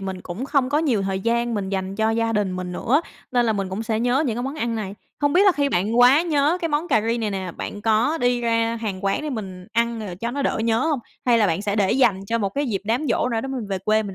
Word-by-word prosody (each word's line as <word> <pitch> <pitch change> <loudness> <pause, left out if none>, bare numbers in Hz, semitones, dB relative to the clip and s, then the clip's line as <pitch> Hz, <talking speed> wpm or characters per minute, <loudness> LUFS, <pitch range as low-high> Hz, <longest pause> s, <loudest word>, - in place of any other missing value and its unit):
mình 190 -1 -5
cũng 185 +10 -6
không 275 -3 +1
có 290 +2 +2
nhiều 250 -11 +1
thời 190 0 -2
gian 235 +1 0
mình 195 -2 -2
dành 190 0 -3
cho 220 0 +2
gia 225 0 0
đình 205 -3 0
mình 180 -1 -4
nữa, 260 - +2 0.3
nên 245 -1 +3
là 220 - +2
mình 195 -2 -2
cũng 195 +4 -4
sẽ 220 -1 -1
nhớ 245 +5 +2
những 230 -2 -1
cái 245 - -2
món 270 +3 -3
ăn 235 -6 -2
này. 205 -3 -4 0.2
Không 290 -1 +1
biết 365 - +5
là 385 - +7
khi 285 -2 +1
bạn 215 +3 0
quá 260 +6 +7
nhớ 310 +1 +2
cái 330 - -1
món 300 +3 -1
cà 220 - +3
ri 230 +1 0
này 215 -2 -1
nè, 190 -3 -4
bạn 205 - -6
có 230 +9 +2
đi 245 0 +1
ra 230 0 +1
hàng 200 -3 -4
quán 195 +8 0
để 305 - -3
mình 190 -6 -6
ăn, 235 0 0
ờ, 195 -5 -5
cho 230 +6 -4
nó 280 +2 -2
đỡ - - 0
nhớ 225 0 +2
hông? 300 -5 +1 0.3
Hay 235 -1 +5
là 210 - +4
bạn 170 +4 -1
sẽ 205 0 -1
để 195 -2 +2
dành 235 -8 +3
cho 230 +2 0
một 200 -3 -1
dịp 200 -5 -1
đám 245 +8 0
giỗ 250 - +1
nào 225 -2 -1
đó 270 - -5
mình 250 -6 -4
về 195 -1 -2
quê 215 +3 +1
mình 195 -2 -7
230 Hz, 295 wpm, -23 LUFS, 200-250 Hz, 0.3 s, là